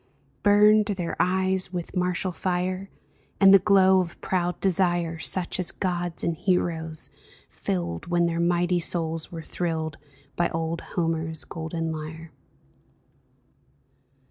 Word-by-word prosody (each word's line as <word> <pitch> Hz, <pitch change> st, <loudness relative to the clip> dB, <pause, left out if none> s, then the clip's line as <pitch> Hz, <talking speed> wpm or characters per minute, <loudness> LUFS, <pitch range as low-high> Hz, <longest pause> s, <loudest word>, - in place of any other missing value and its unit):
Burned 210 Hz, +1 st, +5 dB
their 185 Hz, -5 st, -3 dB
eyes 190 Hz, 0 st, +2 dB
with 175 Hz, 0 st, -5 dB
martial 180 Hz, +1 st, 0 dB
fire. 185 Hz, +2 st, -2 dB, 0.5 s
And 195 Hz, -1 st, +8 dB
the 195 Hz, -, +9 dB
glow 190 Hz, -1 st, +5 dB
of 175 Hz, -2 st, -3 dB
proud 180 Hz, -1 st, -1 dB
desire. 175 Hz, -3 st, +1 dB
Such 185 Hz, +2 st, -1 dB
as 180 Hz, -, +2 dB
gods 175 Hz, -2 st, -1 dB
and 170 Hz, -, 0 dB
hero's 160 Hz, -3 st, -1 dB, 0.4 s
filled 85 Hz, -2 st, -3 dB
When 175 Hz, 0 st, +2 dB
their 170 Hz, 0 st, -1 dB
mighty 175 Hz, +1 st, +2 dB
souls 165 Hz, -1 st, -3 dB
were 165 Hz, -2 st, -7 dB
thrilled 160 Hz, -3 st, -3 dB, 0.4 s
By 175 Hz, -, +1 dB
old 165 Hz, 0 st, -3 dB, 0.2 s
Homer's 160 Hz, -2 st, -1 dB
golden 165 Hz, 0 st, -4 dB
lyre 160 Hz, +1 st, -7 dB
175 Hz, 120 wpm, -25 LUFS, 165-185 Hz, 0.5 s, the